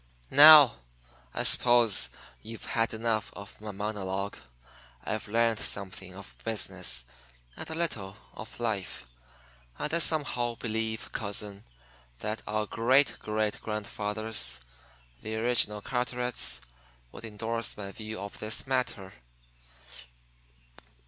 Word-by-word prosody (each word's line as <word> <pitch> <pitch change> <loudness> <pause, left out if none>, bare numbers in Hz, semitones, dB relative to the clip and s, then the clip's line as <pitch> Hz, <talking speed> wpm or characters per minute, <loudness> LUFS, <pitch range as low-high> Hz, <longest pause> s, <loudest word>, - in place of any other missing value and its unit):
"Now, 145 - +10 0.5
I - - -2
suppose 115 - +6 0.3
you've 115 +1 -8
had 115 0 0
enough 110 -1 -2
of 100 +1 -11
my 110 - -7
monologue. 100 -1 -4 0.7
I've 110 +7 -4
learned 115 +1 +1
something 95 -2 -4
of 100 0 -12
business 85 - -2 0.5
and - - -7
a 160 - -2
little 105 - -3 0.2
of 110 +2 -10
life; 105 - -3 0.7
and 150 - -3
I 170 - +3
somehow 130 -7 +1
believe, 110 -1 -3
cousin, 100 -2 -4 0.6
that 105 - -4
our 110 0 -1
great 130 +6 +3
great 105 0 -2
grandfathers, 105 - -2 0.6
the 110 - -5
original 110 -3 +2
Carterets, 125 -1 -1 0.5
would - - -11
indorse 115 +1 -2
my 100 -2 -6
view 110 0 -7
of 100 0 -8
this 110 +1 -2
matter." 125 -8 -2
110 Hz, 110 wpm, -29 LUFS, 105-120 Hz, 0.7 s, Now